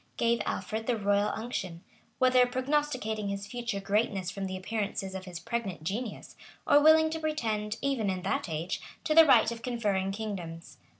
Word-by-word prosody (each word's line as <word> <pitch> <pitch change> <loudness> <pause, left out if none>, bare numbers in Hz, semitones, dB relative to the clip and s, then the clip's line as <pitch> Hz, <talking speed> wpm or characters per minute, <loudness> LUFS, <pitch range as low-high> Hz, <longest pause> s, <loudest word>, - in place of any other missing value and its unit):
gave 235 -1 +2
Alfred 220 +1 -3
the 245 -2 +1
royal 205 0 +2
unction;[*] 195 -7 -5 0.3
whether 255 -1 +5
prognosticating 255 -5 -1
his 200 0 -3
future 240 -3 -4
greatness 195 -2 0
from 195 -1 -4
the 185 0 -4
appearances 195 -1 -3
of 190 -1 -6
his 175 -3 -7
pregnant 195 -4 -4
genius, 210 +6 -4 0.3
or 290 - +6
willing 315 +1 +6
to 320 - -3
pretend, 220 -9 -2
even 265 -7 0
in 185 -1 -3
that 190 - -1
age, 160 +3 -3 0.2
to 310 - +1
the 325 0 +8
right 235 -4 +6
of 230 -1 -6
conferring 205 -6 -1
kingdoms. 190 -6 -6
215 Hz, 170 wpm, -29 LUFS, 195-245 Hz, 0.3 s, the